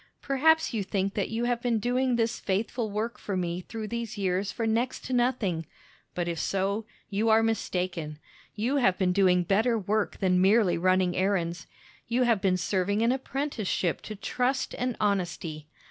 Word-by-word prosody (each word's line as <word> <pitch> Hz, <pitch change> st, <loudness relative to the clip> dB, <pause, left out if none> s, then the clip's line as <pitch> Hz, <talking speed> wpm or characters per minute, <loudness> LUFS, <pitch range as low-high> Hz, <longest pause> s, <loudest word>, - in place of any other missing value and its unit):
Perhaps 320 Hz, +3 st, +3 dB
you 220 Hz, -, 0 dB
think 195 Hz, 0 st, -1 dB
that 200 Hz, -, -1 dB
you 225 Hz, +1 st, -2 dB
have 240 Hz, -1 st, 0 dB
been 240 Hz, -2 st, +1 dB
doing 245 Hz, +3 st, +1 dB
this 230 Hz, 0 st, 0 dB
faithful 220 Hz, +4 st, -1 dB
work 210 Hz, +1 st, -3 dB
for 195 Hz, -2 st, -3 dB
me 175 Hz, 0 st, -2 dB
through 220 Hz, +3 st, -6 dB
these 235 Hz, 0 st, -4 dB
years 195 Hz, 0 st, 0 dB
for 230 Hz, -, -3 dB
next 230 Hz, +3 st, -1 dB
to 260 Hz, -, -3 dB
nothing; 240 Hz, -9 st, +1 dB, 0.5 s
but 175 Hz, -1 st, -1 dB
if 170 Hz, -2 st, -2 dB
so, 200 Hz, +5 st, -1 dB, 0.2 s
you 215 Hz, +3 st, +1 dB
are 220 Hz, +1 st, +5 dB
mistaken. 180 Hz, -8 st, -2 dB, 0.4 s
You 240 Hz, +7 st, 0 dB
have 190 Hz, -9 st, +3 dB
been 185 Hz, -2 st, +2 dB
doing 180 Hz, -2 st, +4 dB
better 220 Hz, +6 st, +2 dB
work 210 Hz, +1 st, -1 dB
than 180 Hz, -1 st, +2 dB
merely 200 Hz, 0 st, +4 dB
running 185 Hz, 0 st, +2 dB
errands. 180 Hz, -3 st, 0 dB, 0.4 s
You 240 Hz, +2 st, +2 dB
have 230 Hz, -5 st, +2 dB
been 190 Hz, -2 st, +2 dB
serving 195 Hz, +3 st, 0 dB
an 235 Hz, -, +3 dB
apprenticeship 260 Hz, -, -2 dB
to 215 Hz, -, -7 dB
trust 250 Hz, +6 st, -1 dB
and 250 Hz, -1 st, -2 dB
honesty. 175 Hz, -7 st, -1 dB
210 Hz, 175 wpm, -28 LUFS, 185-235 Hz, 0.5 s, are